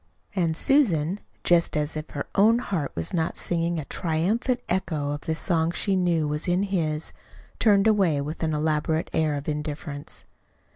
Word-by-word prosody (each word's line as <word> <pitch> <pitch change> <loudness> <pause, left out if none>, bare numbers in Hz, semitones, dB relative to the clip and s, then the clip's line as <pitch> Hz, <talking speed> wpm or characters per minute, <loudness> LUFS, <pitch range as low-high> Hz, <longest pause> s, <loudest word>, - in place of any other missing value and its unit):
And 165 -4 +1
Susan, 195 - +2 0.2
just 170 -2 +3
as 150 +1 -1
if 155 0 -5
her 140 - -4
own 220 +4 +5
heart 180 - -2
was 85 - -3
not 165 -2 0
singing 170 -1 -1
a 150 - -5
triumphant 195 - 0
echo 160 -6 -1
of 145 0 -4
the 160 - -2
song 165 -1 +1
she 195 +3 0
knew 170 -4 +2
was 150 +3 -3
in 180 +2 +2
his, 160 -6 -1 0.5
turned 205 -2 +4
away 195 -9 +3
with 150 +3 -5
an 160 -2 0
elaborate 155 +1 0
air 155 -2 +1
of 140 0 -6
indifference. 150 -1 -2
160 Hz, 165 wpm, -25 LUFS, 150-185 Hz, 0.5 s, own